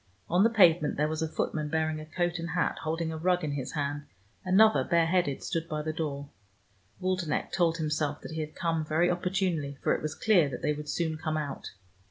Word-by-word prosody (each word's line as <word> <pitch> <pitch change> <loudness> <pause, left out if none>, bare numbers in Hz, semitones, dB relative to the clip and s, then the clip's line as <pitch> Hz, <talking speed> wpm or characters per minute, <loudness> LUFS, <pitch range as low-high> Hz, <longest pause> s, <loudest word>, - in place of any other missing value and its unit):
On 180 +3 +5
the 225 - +5
pavement 175 -8 +4
there 150 +1 +2
was 155 0 -3
a 160 - 0
footman 155 -1 -2
bearing 155 0 0
a 155 - -9
coat 175 +1 -1
and 165 0 -4
hat, 175 +1 0
holding 160 +1 -2
a 160 - -4
rug 180 +2 +1
in 150 - -1
his 135 -3 -4
hand: 145 -1 -3 0.4
another, 190 -5 +5
bareheaded, 170 -2 +1
stood 165 -3 -3
by 150 -1 -2
the 155 0 -2
door. 145 -3 -3 0.7
Waldenech 185 -4 -1
told 165 -2 +2
himself 150 -2 -1
that - - -8
he 160 - -4
had 155 0 -6
come 165 -2 -1
very 160 +3 +2
opportunely, 175 -6 -1
for - - +3
it - - -2
was 155 +1 -3
clear 180 -10 +3
that 125 - -7
they 150 - +2
would 150 0 -7
soon 160 -1 -1
come 155 -1 -2
out. 145 -3 -4
160 Hz, 215 wpm, -29 LUFS, 150-175 Hz, 0.7 s, On